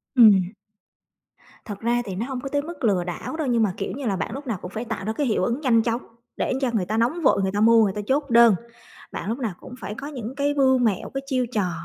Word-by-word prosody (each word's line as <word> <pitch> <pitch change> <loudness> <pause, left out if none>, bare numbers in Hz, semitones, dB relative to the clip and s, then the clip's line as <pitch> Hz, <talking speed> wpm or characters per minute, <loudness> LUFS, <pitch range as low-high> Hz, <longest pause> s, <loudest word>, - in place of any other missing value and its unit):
Ừm. 200 -7 +6 1.2
Thật 205 -2 -7
ra 240 +1 +1
thì 190 -2 -5
nó 220 - -2
hông 260 -1 -5
có 275 - -5
tới 285 0 0
mức 315 -3 -9
lừa 195 -5 +2
đảo 175 - -5
đâu, 310 - -2
nhưng 235 -2 +2
mà, 200 -4 +1
kiểu - - -3
như 270 0 -6
là, 200 -3 0
bạn 180 - -3
lúc 275 +1 -7
nào 225 -5 -1
cũng 180 - -7
phải 225 +3 -4
tạo 225 -4 -5
ra 220 - -1
cái 280 +3 -1
hiệu 215 - +1
ứng 240 +8 -1
nhanh 235 -5 +4
chóng 230 +2 -1 0.4
để - - 0
cho 260 - +1
người 205 -5 0
ta 215 +4 -2
nóng 255 +10 +1
vội, 230 - +3
người 190 0 0
ta 205 +2 -1
mua, 225 0 +6
người 195 -2 +1
ta 210 - -4
chốt 280 +1 0
đơn. 235 -3 +7 0.6
Bạn - - -5
lúc 230 - -1
nào 220 -7 -2
cũng - - -11
phải 205 +1 -6
có 275 +4 -7
những 255 -4 -6
cái 285 0 0
mưu 265 -2 +4
mẹo, 220 -6 0
cái 270 - -2
chiêu 260 -2 0
trò 195 -6 0
235 Hz, 280 wpm, -24 LUFS, 210-265 Hz, 1.2 s, đơn